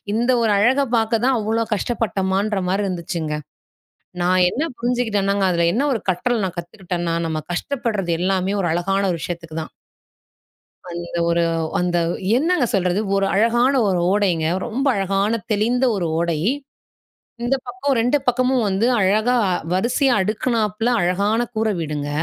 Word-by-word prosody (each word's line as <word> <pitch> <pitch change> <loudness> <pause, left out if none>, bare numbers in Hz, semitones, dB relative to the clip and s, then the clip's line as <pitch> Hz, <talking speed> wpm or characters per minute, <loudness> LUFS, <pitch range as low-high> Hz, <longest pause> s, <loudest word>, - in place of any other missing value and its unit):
இந்த 240 +3 +1
ஒரு 225 - +2
அழகை 260 +7 +3
பாக்க 225 0 0
தான் 265 -1 +3
அவ்வளோ 225 +1 0
கஷ்டப்பட்டமான்ற 200 -2 -1
மாரி 195 +2 0
இருந்துச்சுங்க. 170 -4 -3 0.9
நான் 180 +1 +3
என்ன 280 - -2 0.2
புரிஞ்சுகிட்டேன்னாங்க, 210 -5 0
அதில 170 -1 +2
என்ன 270 +7 +1
ஒரு 225 - -1
கற்றல் 220 +4 0
நான் 185 -1 -5
கத்துக்கிட்டேன்னா, 175 -1 -4
நம்ம 155 -1 -2
கஷ்டப்படுறது 210 -4 -2
எல்லாமே, 190 +1 0
ஒரு 175 - 0
அழகான 195 +3 0
ஒரு 170 - -2
விஷயத்துக்கு 165 -2 -6
தான். - - -12 1.2
அந்த 170 0 -5
ஒரு 170 0 +2 0.4
அந்த 175 -1 +1 0.4
என்னங்க 320 +1 +2
சொல்றது, 185 0 +1 0.2
ஒரு 195 0 +2
அழகான 240 +6 +3
ஒரு 185 -2 +1
ஓடைங்க, 180 -6 +1 0.2
ரொம்ப 250 +4 -2
அழகான 195 +3 0
தெளிந்த 230 +5 +1
ஒரு 175 -3 -1
ஓடை. 170 -2 0 1.1
இந்த 260 +3 +2
பக்கம் 255 +3 -1
2 245 +5 +2
பக்கமும் 250 -1 +2
வந்து 195 +5 +1
அழகா 215 +6 +2 0.4
வரிசையா 245 +7 +2
அடுக்கினாப்புல 215 +1 0
அழகான 200 +6 +1
கூரை 220 0 +1
வீடுங்க. 150 -2 -3
200 Hz, 140 wpm, -21 LUFS, 180-235 Hz, 1.2 s, அழகை